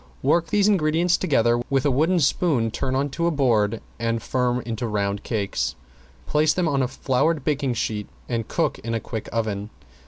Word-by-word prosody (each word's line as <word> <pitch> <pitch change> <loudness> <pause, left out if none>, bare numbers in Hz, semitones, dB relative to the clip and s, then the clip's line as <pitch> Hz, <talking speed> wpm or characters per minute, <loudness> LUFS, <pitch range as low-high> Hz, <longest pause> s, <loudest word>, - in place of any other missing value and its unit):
Work 170 -1 +3
these 200 +4 +3
ingredients 170 -2 +3
together, 120 -10 +2
with 135 -1 +1
a 145 - +3
wooden 160 +7 +2
spoon 135 -6 +2
turn 130 +3 -2
on 140 +2 0
to 170 +4 0
a - - +4
board 115 -8 +1 0.2
and 115 0 0
form 125 +1 0
into 115 +1 -4
round 100 -1 -1
cakes. 105 -4 -2 0.5
Place 150 0 +2
them 180 -2 +1
on 140 -3 +1
a 130 - +1
floured 135 +4 0
baking 140 -4 0
sheet 105 -2 -2 0.2
and 115 -3 -2
cook - - -1
in 115 0 -3
a - - 0
quick 110 -1 -6
oven. 105 -2 -2
130 Hz, 185 wpm, -23 LUFS, 115-155 Hz, 0.5 s, a